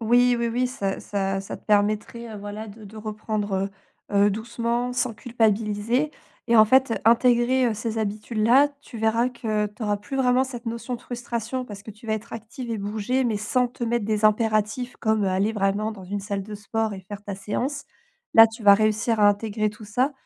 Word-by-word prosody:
Oui, 245 +2 +4
oui 235 - 0
oui 245 +2 0
ça 200 -7 -3
ça 195 -1 -2
ça 195 - -7
te - - -20
permettrait 215 +2 0
voilà 205 +2 -7
de 215 +1 -12
de 205 +2 -12
reprendre, 210 -2 -2 0.4
heu, 205 - -1
heu, 205 - +3
doucement, 235 +3 -2
sans 250 -1 0
culpabiliser 225 +3 0 0.4
et 235 - +6
en 215 - +9
fait, 260 +1 +3
intégrer 240 +1 +4
ces 220 +1 -3
habitudes-là. 220 +5 +2
Tu 260 - -11
verras 225 +2 +2
que 220 -4 -1
tu 210 +3 -10
auras 205 -1 +1
plus 270 +7 -6
vraiment 255 0 +3
cette 250 -2 -8
notion 235 +2 -3
de 240 - -7
frustration, 245 +1 -4
parce 205 -3 -9
que 220 - -9
tu 215 +2 -14
vas 220 - +1
être 220 +2 -7
active 230 +2 -7
et 225 - -2
bouger, 215 +6 -1
mais 225 -3 0
sans 250 +4 +1
te 240 0 -5
mettre 235 -1 0
des 215 -1 0
impératifs 215 +2 +1
comme, 220 -2 +1
heu, - - +1
aller 195 +4 +1
vraiment 205 +1 0
dans 195 -3 -11
une 200 +2 -4
salle 200 0 -3
de 210 +1 -8
sport 215 +1 -2
et 190 - -8
faire 200 +2 -9
ta 205 -1 -5
séance. 245 +9 -3 0.5
Là, 225 0 +10
tu 225 0 -11
vas 200 - +8
réussir 215 +1 +1
à 205 - +7
intégrer 215 +1 0
tout 210 +1 -10
ça. 250 +7 0
220 Hz, 205 wpm, -24 LUFS, 205-240 Hz, 0.5 s, Là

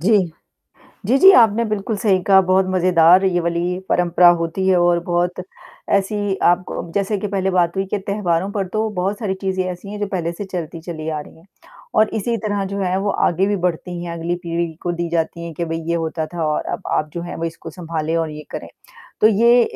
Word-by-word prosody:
जी, 210 +5 +4 0.9
जी, 245 +6 +3
जी 385 +6 +9
आपने 230 - +5
बिल्कुल 215 0 -2
सही 200 -2 +2
कहा 190 +1 +6
बहुत 185 +1 +2
मज़ेदार 180 0 +4
ये 175 -2 +2
वाली 170 +1 -1
परंपरा 175 0 +4
होती 170 +3 -2
है 190 -1 +4
और 175 0 +3
बहुत 175 +1 -1 0.5
ऐसी 200 0 -1
आप 175 +1 +3
क 170 - -5
जैसे 200 +1 0
कि 210 - -3
पहले 190 -1 -1
बात 175 -1 +1
हुई 195 - 0
के 210 - 0
त्योहारों 195 -2 -1
पर 200 -2 -2
तो 215 +3 -1
बहुत 195 +3 -1
सारी 205 -5 -2
चीज़ें 190 -1 -1
ऐसी 180 +2 -6
हैं, 210 - -6
जो 205 - 0
पहले 175 -4 -2
से 190 +4 -6
चलती 170 -3 -6
चली 160 -2 -6
आ 155 -1 -2
रही - - -13
हैं 165 - -20 0.5
और 215 - +4
इसी 230 +2 -1
तरह 205 -3 -2
जो 200 +1 -4
है 185 -1 0
वो 200 +1 0 0.2
आगे 180 +3 +1
भी 205 0 0
बढ़ती 175 -1 -3
हैं 170 - -5
अगली 170 +1 -2
पीढ़ी 170 -1 -2
को 175 - -1
दी 170 0 -3
जाती 170 0 -2
है 165 - -7
कि 170 - -2
भई 165 0 -3
ये 170 - +1
होता 160 -1 -2
था 170 0 -4
और 150 -1 0
अब - - -4
आप 155 - -1
जो 170 - -3
है 175 - -6
इसको 165 - -8
संभालें 165 -2 -3
और 165 -1 -1
ये 150 0 -8
करें, - - -6 0.5
तो - - +6
ये 235 +3 +5
180 Hz, 225 wpm, -20 LUFS, 170-200 Hz, 0.9 s, जी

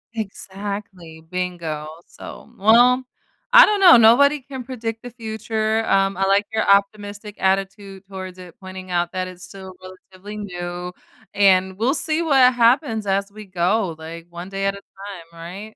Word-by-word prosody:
Exactly, 195 -5 -7
bingo, 170 -4 -4 0.2
so, - - -12
well, 240 +5 +5 0.5
I - - +10
don't 420 -1 0
know. 360 -8 +8
Nobody 275 +6 +5
can 265 -1 -8
predict 225 -3 -6
the 245 - -7
future. 220 -1 -2
Um, 195 -1 +1
I 195 - +1
like 200 +1 +2
your 220 - +1
optimistic 205 +1 0
attitude 195 0 -2
towards 185 -1 -8
it, 180 -2 -12
pointing 185 -1 -10
out 175 -1 0
that 185 -1 -3
it's 180 0 -12
still 190 0 -11
relatively 185 +2 -12
new, 180 -2 -6 0.4
and 190 -1 +3
we'll 235 +6 +1
see 310 +2 -1
what 265 -5 +4
happens 235 -2 +2
as 200 +1 -1
we 215 +1 -11
go, 185 0 -1
like, 165 +1 -9
one 175 +2 -9
day 195 0 -3
at 195 - +1
a 200 - -11
time, 195 -4 -11
right? 195 +6 -9
200 Hz, 160 wpm, -21 LUFS, 185-220 Hz, 0.5 s, I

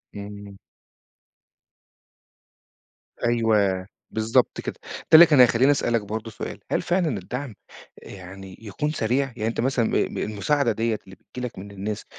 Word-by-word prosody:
إمم. 100 -1 -9 2.7
أيوه، 105 -5 +2 0.2
بالضبط 115 +3 +1
كده، - - -5
ده - - -13 0.2
اللي 170 +2 +11
كان 150 -5 +3
هيخليني 125 +3 +6
أسألك 120 -5 +1
برضه 110 +2 -5
سؤال، - - -7
هل - - +1
فعلًا 175 - 0
الدعم 125 +6 -6 0.5
يعني 95 0 -11
يكون 115 +8 -3
سريع؟ 130 0 0
يعني 110 -1 -2
أنت 115 - -3
مثلًا 125 -2 +1
م - - -2 0.2
م - - -6
المساعدة 120 +5 0
ديَّة 110 0 -1
اللي 95 - -13
بتيجي 125 +5 -8
لك 115 - -11
من 100 +2 -9
الناس، 100 +2 -5
110 Hz, 145 wpm, -24 LUFS, 100-125 Hz, 2.7 s, اللي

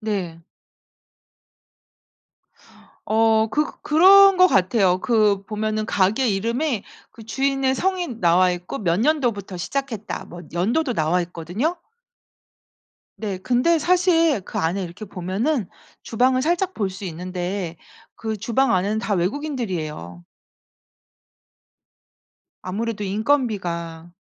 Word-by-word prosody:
네. 180 -7 -4 2.6
어 220 0 +3
그 300 +1 0
그런 385 +4 +7
것 365 - +8
같아요. 185 - +2
그 210 -3 +2
보면은 215 0 -2
가게 215 +5 +1
이름에 230 +4 -1 0.3
그 225 - -14
주인의 270 +3 0
성이 370 +2 -1
나와 180 -1 +4
있고 180 0 -5
"몇 175 -4 0
년도부터 235 - 0
시작했다." 230 +1 -4
뭐 175 - -11
연도도 235 - 0
나와 160 +3 +1
있거든요. 175 - -3 1.4
네. 200 -4 -4
근데 255 - +2
사실 335 - +3
그 - - -6
안에 170 +5 -1
이렇게 175 +4 -8
보면은 200 - -2 0.3
주방을 255 +3 +1
살짝 350 +4 0
볼 200 -3 -1
수 185 +2 -9
있는데 180 0 -4 0.4
그 220 -1 -4
주방 235 +4 +1
안에는 200 +4 0
다 220 -2 -1
외국인들이에요. 180 - -3 2.4
아무래도 210 +3 -3
인건비가. 190 - -2
215 Hz, 230 characters per minute, -22 LUFS, 180-265 Hz, 2.6 s, 것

